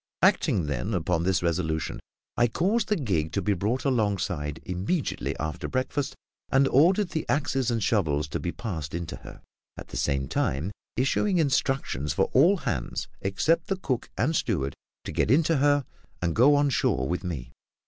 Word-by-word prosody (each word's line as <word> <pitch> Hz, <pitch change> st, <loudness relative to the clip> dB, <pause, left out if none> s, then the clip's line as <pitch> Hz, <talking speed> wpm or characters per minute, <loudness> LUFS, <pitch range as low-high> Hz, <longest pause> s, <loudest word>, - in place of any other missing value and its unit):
Acting, 85 Hz, -, +3 dB
then, 75 Hz, -, -2 dB
upon 85 Hz, -1 st, 0 dB
this 90 Hz, +1 st, +1 dB
resolution, 80 Hz, -2 st, -1 dB, 0.4 s
I 120 Hz, -, +4 dB
caused 195 Hz, -, +1 dB
the 210 Hz, -, +2 dB
gig 90 Hz, -, -1 dB
to 100 Hz, -, 0 dB
be 105 Hz, -, +2 dB
brought 105 Hz, +9 st, -1 dB
alongside 100 Hz, -, 0 dB
immediately 100 Hz, -, -2 dB
after 80 Hz, +1 st, -3 dB
breakfast; 130 Hz, +2 st, -2 dB, 0.4 s
and 135 Hz, +1 st, +4 dB
ordered 180 Hz, +7 st, +4 dB
the 160 Hz, -, -2 dB
axes 135 Hz, -3 st, +1 dB
and 115 Hz, -3 st, 0 dB
shovels 75 Hz, -9 st, +1 dB
to -, -, -3 dB
be 85 Hz, -, -2 dB
passed 80 Hz, -, -5 dB
into 85 Hz, -1 st, -4 dB
her, -, -, -12 dB, 0.3 s
at -, -, -9 dB
the -, -, -6 dB
same 70 Hz, -2 st, 0 dB
time 70 Hz, +10 st, -1 dB, 0.3 s
issuing 175 Hz, -, +2 dB
instructions 135 Hz, -, 0 dB
for 95 Hz, -, +1 dB
all 170 Hz, +10 st, +5 dB
hands 65 Hz, -, -3 dB
except 155 Hz, -, +1 dB
the 195 Hz, -, -1 dB
cook 130 Hz, -9 st, -2 dB
and 135 Hz, -, +1 dB
steward 70 Hz, -, 0 dB, 0.3 s
to -, -, -5 dB
get -, -, 0 dB
into 155 Hz, +4 st, +4 dB
her 145 Hz, 0 st, +3 dB, 0.3 s
and 85 Hz, -2 st, -1 dB
go 135 Hz, +6 st, +6 dB
on 145 Hz, -1 st, +3 dB
shore 65 Hz, -, +1 dB
with 90 Hz, +4 st, -2 dB
me. 70 Hz, -9 st, -5 dB
105 Hz, 170 wpm, -27 LUFS, -, 0.4 s, go